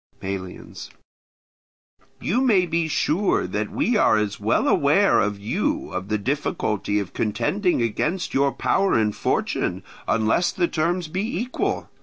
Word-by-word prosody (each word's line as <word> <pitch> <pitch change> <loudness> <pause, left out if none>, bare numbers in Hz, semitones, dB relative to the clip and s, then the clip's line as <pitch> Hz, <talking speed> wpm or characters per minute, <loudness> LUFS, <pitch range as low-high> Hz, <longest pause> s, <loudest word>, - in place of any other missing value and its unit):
Melians. 95 -2 -7 1.3
You 240 +8 0
may 205 -8 +4
be 165 -1 0
sure 165 +5 +1
that 105 +3 -3
we 240 - 0
are 110 - +4
as 105 -1 -2
well - - +1
aware - - +4
as 105 -1 -1
you 100 +2 -2
of 95 +1 -4
the 105 - 0
difficulty 105 - -1
of 100 -3 -3
contending 120 - 0
against 150 - -1
your 140 +1 +2
power 195 +6 +1
and 105 -2 +1
fortune, - - -1 0.2
unless 115 +10 +2
the 175 - 0
terms 170 +2 -1
be 195 - -3
equal. 250 +2 -2
140 Hz, 140 wpm, -23 LUFS, -, 1.3 s, may